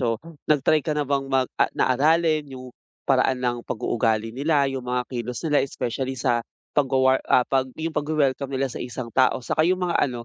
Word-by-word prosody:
So, 115 -3 +1 0.3
nag-try 150 +1 +3
ka 150 0 -2
na 150 - 0
bang 140 0 -1
mag 130 -1 +2 0.3
na - - +3
aralin 155 +2 +2
yung 130 -1 -9 0.3
paraan 130 -1 +2
ng 125 -1 -1
pag-uugali 110 -1 0
nila, 145 +1 +2
yung 135 -1 -3
mga 125 0 0
kilos 120 0 -4
nila 150 -2 +3
especially 130 0 -3
sa 120 -3 +1 0.3
pag, 145 -2 +2
ah, 130 -1 +3
pagwawa 130 -1 0
ah, - - -25
yung 165 +1 -3
pagwe-welcome 145 -2 0
nila 135 0 0
sa - - -7
isang 120 -2 -6
tao 130 - +3
tsaka - - 0
yung 185 0 +1
mga 175 - -1
ano, 120 -2 -6
130 Hz, 195 wpm, -24 LUFS, 125-145 Hz, 0.3 s, nag-try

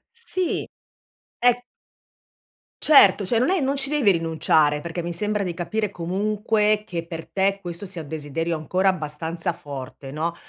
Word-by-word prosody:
Sì. 375 -7 -1 0.7
È 245 0 +3 1.2
Certo, 205 -9 +6
cioè 225 +5 +2
non 255 +8 +2
è 375 -4 +2
non 275 +1 0
ci 275 0 +1
devi 285 -9 +4
rinunciare. 160 -3 +2
Perché 170 +1 -4
mi 170 +1 -4
sembra 210 +3 -1
di 175 -2 -3
capire 210 +5 -2
comunque 210 +4 0
che 170 -3 -5
per 165 -2 -6
te 195 0 0
questo 175 +2 -6
sia 180 -3 -1
un - - -12
desiderio 160 +2 -3
ancora 185 +5 +1
abbastanza 165 0 -3
forte 135 -1 -8
no? 165 +3 -2
180 Hz, 155 wpm, -23 LUFS, 165-215 Hz, 1.2 s, Certo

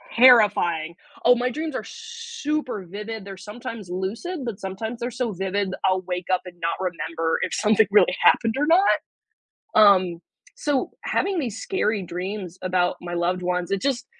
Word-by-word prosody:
terrifying. 205 -10 +5 0.3
Oh, 245 +1 +7
my 245 +1 0
dreams 310 +3 -4
are - - -3
super 450 - -4
vivid 210 +2 -6
they're 195 -1 -7
sometimes 210 0 -8
lucid, 230 - -4
but 230 -5 -5
sometimes 220 +5 -5
they're 240 +1 -2
so 240 -2 -2
vivid, 190 +1 -2
I'll 185 0 +2
wake 180 -1 -3
up 185 - +2
and 180 -1 -10
not 165 0 -1
remember 165 -3 -2
if - - -2
something 215 0 +3
really 195 -3 +5
happened 225 -1 +4
or 290 - +2
not. 365 +5 +5 0.8
Um, 185 -5 +5 0.4
so, 285 -3 -1
having 385 -2 0
these 235 -7 -3
scary 220 - -1
dreams 180 +1 -5
about 180 -1 +1
my 175 0 -5
loved 175 +1 0
ones, 180 0 -1
it 195 - 0
just 270 -2 -1
205 Hz, 165 wpm, -24 LUFS, 180-245 Hz, 0.8 s, Oh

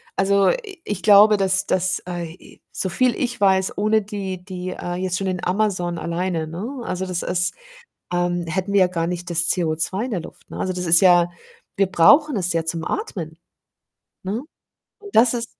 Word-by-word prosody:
also, 195 0 +3
i 400 -8 -4
ich 205 -3 -4
glaube, 210 0 +7
dass 195 0 +1
dass 185 0 +2
ai 175 -2 -5
i - - -18
so 190 - 0
viel 250 +5 +1
ich 250 -2 -3
weiß, 190 -1 +2
ohne 215 +1 +2
die 195 -3 -6
die, 185 -1 -6
äh, 175 -1 -5
jetzt 185 0 -2
schon 195 - -3
in 180 -1 -3
Amazon 180 -3 -1
alleine, 170 -1 -3
ne, 225 - -6
also, 185 +1 -3
das 180 -1 -2
ist 180 0 0 0.6
ähm, 175 -1 -1
hätten 190 +4 -3
wir 200 - +4
ja 185 - +5
gar 165 -2 -2
nicht 180 0 -5
das 170 0 +3
CO2 175 +5 -1
in 255 - -5
der 180 - -1
Luft, - - -13
ne? - - -8
Also, 185 - -2
das 180 -1 -4
ist 165 0 +7
ja 175 -2 +5 0.5
wir 195 0 +3
brauchen 275 - +4
es 180 -2 +1
ja 165 -1 -1
zum 165 0 -3
Atmen, 165 - -5 0.9
ne, 215 +8 -3 0.6
und 410 -1 -12
das 235 +2 +5
ist 235 -1 -2
185 Hz, 195 wpm, -21 LUFS, 175-205 Hz, 0.9 s, glaube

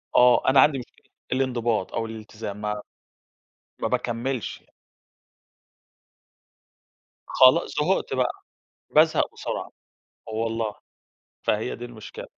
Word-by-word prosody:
آه، 125 +1 +6
أنا 135 0 +6
عَندي 140 -3 +4
مشكلة 120 - -14 0.2
الإنضباط 120 -6 0
أو 115 -1 -1
الإلتزام 110 -2 -7
مع 105 0 -2 1.0
ما - - +1
باكمّلش 125 0 -2
يع - - -32 2.6
خلاص 130 +6 +5
زهقت 170 -2 +1
بقى، 125 -1 +1 0.6
بازهَق - - +4
بسرعة، - - -4 0.6
والله، 110 -1 -2 0.7
فهي 110 +4 0
دي 120 - -7
المشكلة. 115 -3 -9
120 Hz, 95 wpm, -25 LUFS, 110-130 Hz, 2.6 s, آه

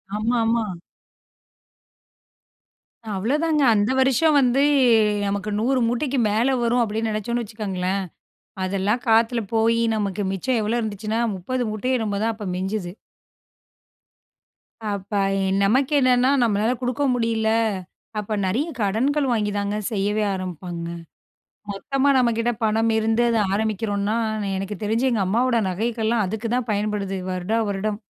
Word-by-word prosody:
ஆமா, 230 +3 0
ஆமா. 230 0 +2 2.5
அவ்வளோதாங்க. 300 +9 +1
அந்த 205 +3 +2
வருஷம் 270 +4 +3
வந்து 260 +1 +3 0.6
நமக்கு 200 +1 -2
100 255 +3 +1
மூட்டைக்கு 260 +3 -1
மேல 235 +6 +2
வரும். 240 +1 +2
அப்படின்னு 220 +1 -2
நினைச்சோம்னு 235 +3 -2
வச்சுக்கோங்களேன். 195 -3 -3 0.6
அதெல்லாம் 200 +5 0
காத்துல 225 +1 +3
போயி, 230 +1 +3 0.2
நமக்கு 205 -1 -2
மிச்சம் 225 +6 0
எவ்ளோ 225 +3 0
இருந்துச்சுன்னா 215 +1 -2 0.2
30 250 +8 -3
மூட்டயோ 250 +5 -1
என்னமோ 210 -3 -2
தான் 225 0 0
அப்ப 210 -2 -7
மிஞ்சுது. 190 -1 -3 2.0
அப்ப 200 0 -4 0.3
எ - - 0 0.2
நமக்கு 260 +8 +2
என்னன்னா, 255 0 +3
நம்மளால 220 +1 +1
குடுக்க 250 +3 -1
முடியல. 230 -2 0 0.7
அப்ப 210 +1 -3
நெறைய 235 - 0
கடன்கள் 260 +8 +1
வாங்கி 210 -3 0
தாங்க 205 +1 -1
செய்யவே 210 +1 0
ஆரம்பிப்பாங்க. 175 -2 -5 0.8
மொத்தமா 270 +8 0
நம்மகிட்ட 235 -1 +1
பணமிருந்து 225 +1 +2
அத 230 - +2 0.2
ஆரம்பிக்கிறோன்னா, 210 0 -1 0.4
எனக்கு 195 +2 -4
தெரிஞ்சு 230 +5 +1
எங்க 225 -5 +1
அம்மாவோட 235 +4 +2
நகைகள்லாம் 220 +2 0
அதுக்குதான் 230 +4 -2
பயன்படுது, 205 -2 -1
வருடா 185 +5 -1
வருடம். 205 +1 -2
220 Hz, 115 wpm, -23 LUFS, 205-240 Hz, 2.5 s, வருஷம்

